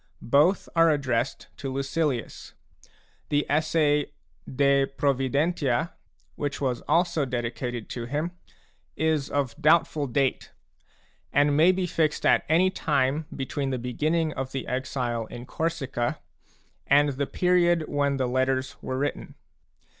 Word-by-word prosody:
Both 160 +7 +4
are 165 0 +5
addressed 130 -4 -1
to 135 -2 -5
Lucilius. 140 -2 -2 0.7
The 145 0 +1
essay 150 -1 +2 0.4
De 140 0 +3
Pfovidentia, 140 +2 0 0.4
which 145 -1 -4
was 130 -3 -1
also 170 -3 +2
dedicated 120 -2 -3
to 120 -2 -5
him, 150 +7 -2 0.6
is 155 -3 0
of 140 -5 -1
doubtful 155 -1 +3
date, 135 +1 0 0.8
and 145 0 +3
may 165 +5 +6
be 185 0 -1
fixed 160 -3 0
at - - +4
any 180 +4 +4
time 145 -2 0
between 135 +1 -3
the 130 - -1
beginning 155 +6 -1
of 130 0 -5
the 135 - -3
exile 125 -3 -2
in 120 +2 -9
Corsica 140 -7 -2 0.7
and 145 +1 +5
the 140 0 -2
period 175 -2 +2
when 140 -1 0
the 130 - 0
Letters 130 +1 0
were 130 - -3
written. 145 +2 -3
140 Hz, 125 wpm, -26 LUFS, 130-155 Hz, 0.8 s, may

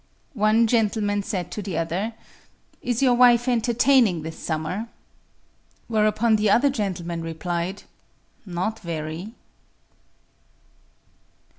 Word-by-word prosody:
One 215 0 +3
gentleman 215 -3 +1
said 190 -4 -4
to 210 - -4
the 190 -5 -4
other: 180 +7 -2 0.7
"Is 245 +1 -1
your 255 -2 +5
wife 240 0 +5
entertaining 240 - +3
this 160 +1 -7
summer?" 165 +7 -3 1.0
Whereupon 215 0 +2
the 210 0 +1
other 270 +7 +4
gentleman 180 -8 -3
replied: 170 +3 -4 0.6
"Not 195 +3 -3
very." 165 +3 -5
210 Hz, 100 wpm, -24 LUFS, 175-230 Hz, 1.0 s, your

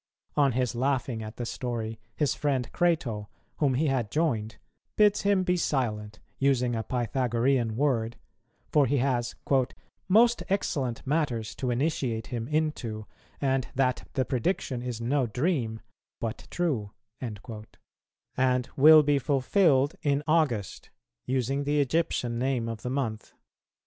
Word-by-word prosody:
On 140 -3 +3
his 125 -2 0
laughing 125 -2 -1
at 110 0 -7
the 120 - -3
story, 115 -3 -4 0.2
his 150 -3 +1
friend 135 -5 -1
Crato, 125 -12 0 0.3
whom 140 -4 +2
he 150 +5 +1
had 130 -7 0
joined, 110 -7 -1 0.4
bids 210 -1 +4
him 200 -2 +2
be 180 0 +1
silent, 110 -10 -1 0.2
using 125 -3 +2
a 115 - -1
Pythagorean 120 0 0
word; 120 -4 0 0.5
for 145 -3 +4
he 140 +4 +1
has 120 -2 0 0.7
"most 230 +5 +5
excellent 140 - -1
matters 130 -7 -1
to 130 - -3
initiate 125 -3 -1
him 115 -1 -3
into, 145 -9 -2 0.3
and 135 -2 0
that 130 -1 0
the 130 - +1
prediction 130 -2 -1
is 125 -2 -4
no 130 +2 +1
dream 120 - -1 0.4
but 115 0 -5
true," 140 -13 -1 0.3
and 125 +3 -4
will 155 +2 +8
be 145 -1 +2
fulfilled 140 +2 +3
in 145 0 +1
August, 150 - 0 0.4
using 135 +2 0
the 145 +1 +1
Egyptian 130 -5 0
name 125 -2 0
of 115 -2 -5
the 125 - -4
month. 120 -5 -3
130 Hz, 135 wpm, -28 LUFS, 115-145 Hz, 0.7 s, will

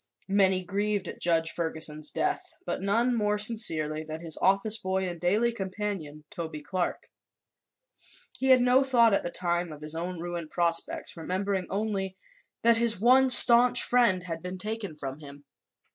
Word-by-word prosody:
Many 190 -2 +2
grieved 205 +1 -2
at - - -9
Judge 165 -1 +1
Ferguson's 160 -2 -3
death, 370 -1 -3
but - - -3
none 230 +5 +1
more 210 -2 0
sincerely 160 -9 +1
than 155 0 -7
his 165 -2 0
office 200 +3 +2
boy 190 0 -2
and 175 -2 -7
daily 210 +7 +1
companion, 190 -7 -6
Toby 160 -3 -6
Clark. 180 +2 -3 1.3
He 265 - -1
had 260 -1 +5
no 250 +2 +3
thought, 235 -5 +3
at - - +2
the - - -3
time, 175 -1 -1
of 150 0 -11
his 155 0 -1
own 175 +2 -5
ruined 170 -2 -6
prospects, 170 -1 -2
remembering 185 +2 -3
only 195 -2 -3 0.5
that 230 0 +5
his 230 -3 +2
one 260 +4 +4
staunch 245 -1 +7
friend 235 -7 +2
had 165 -2 -6
been 180 +1 -7
taken 210 -3 -5
from 135 -1 -7
him. 145 -1 -12
190 Hz, 160 wpm, -27 LUFS, 165-220 Hz, 1.3 s, staunch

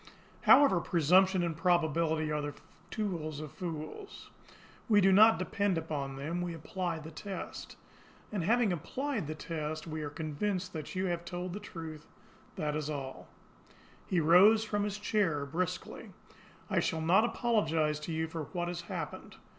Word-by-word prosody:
However, 265 -10 +7
presumption 180 +3 +4
and 170 -2 -1
probability 160 -2 +1
are 150 0 0
the 145 -1 -5 0.3
tools 165 -8 -3
of 155 -2 -7
fools. 175 - -7 0.6
We 210 -2 +6
do 195 -1 +5
not 220 +4 +7
depend 190 0 0
upon 145 -4 -3
them 155 +6 -3
we 175 -1 -3
apply 170 +1 -3
the 160 0 -9
test. 195 +4 -7 0.6
And 200 -5 -2
having 225 +1 +3
applied 240 - -3
the 155 - -4
test, 155 -1 -4
we 155 -1 -5
are 150 - -3
convinced 180 +5 -3
that 155 0 -6
you 185 +1 0
have 175 -2 -2
told 175 0 -5
the 205 - -4
truth 160 -5 -8 0.5
that 150 -1 -2
is 155 -1 -2
all." 135 -3 -5 0.8
He 180 - +1
rose 185 +8 +6
from 205 -2 -1
his 205 0 -3
chair 195 -9 0
brusquely. 180 +5 -4 0.6
"I - - +1
shall 160 - -1
not 180 +7 +4
apologise 165 -11 +1
to 150 +2 -6
you 160 0 -1
for 160 -1 -5
what 175 +3 -3
has 175 0 -4
happened. - - -6
170 Hz, 160 wpm, -31 LUFS, 155-190 Hz, 0.8 s, However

